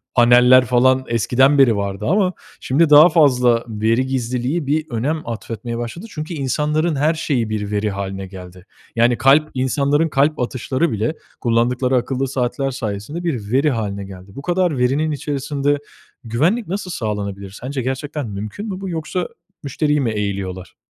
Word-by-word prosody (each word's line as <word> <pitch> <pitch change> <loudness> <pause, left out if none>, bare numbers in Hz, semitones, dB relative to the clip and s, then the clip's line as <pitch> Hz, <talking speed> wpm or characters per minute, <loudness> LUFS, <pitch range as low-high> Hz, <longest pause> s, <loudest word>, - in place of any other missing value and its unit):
paneller 125 +1 +6
falan 130 +2 +3
eskiden 130 +5 +3
beri 125 -5 +5
vardı 100 0 -3
ama 185 +1 +2 0.3
şimdi 150 +4 +2
daha 150 +4 +9
fazla 125 -7 +3
veri 115 +3 0
gizliliği 130 +4 -2
bir 155 +2 +1
önem 140 +6 -2
atfetmeye 115 0 -5
başladı. 120 - -6
Çünkü 155 -1 -6
insanların 150 +3 0
her 150 +4 +2
şeyi 130 -8 -1
bir 105 -1 -3
veri 105 0 0
hâline 95 -1 -5
geldi. 90 0 -12 0.3
Yani 120 +1 +3
kalp, 150 +3 +4
insanların 140 +4 +1
kalp 145 +2 +1
atışları 130 +4 -1
bile 110 +8 -1 0.3
kullandıkları 125 +2 +1
akıllı 130 +2 0
saatler 135 +1 -1
sayesinde 120 - -5
bir 120 -11 -3
veri 140 +4 +3
hâline 100 -4 -3
geldi. 95 0 -12
Bu 140 - -7
kadar 175 -3 0
verinin 140 +5 +1
içerisinde, 145 0 -1 0.5
güvenlik 160 - 0
nasıl 185 0 -4
sağlanabilir? 100 - -4
Sence 130 +1 -3
gerçekten 135 +2 -4
mümkün 105 - -6
mü 190 0 -5
bu? 190 - -4
Yoksa 165 +2 -3 0.4
müşteriyi 150 +1 0
mi 120 - 0
eğiliyorlar? 95 -3 -4
130 Hz, 150 wpm, -19 LUFS, 115-150 Hz, 0.5 s, daha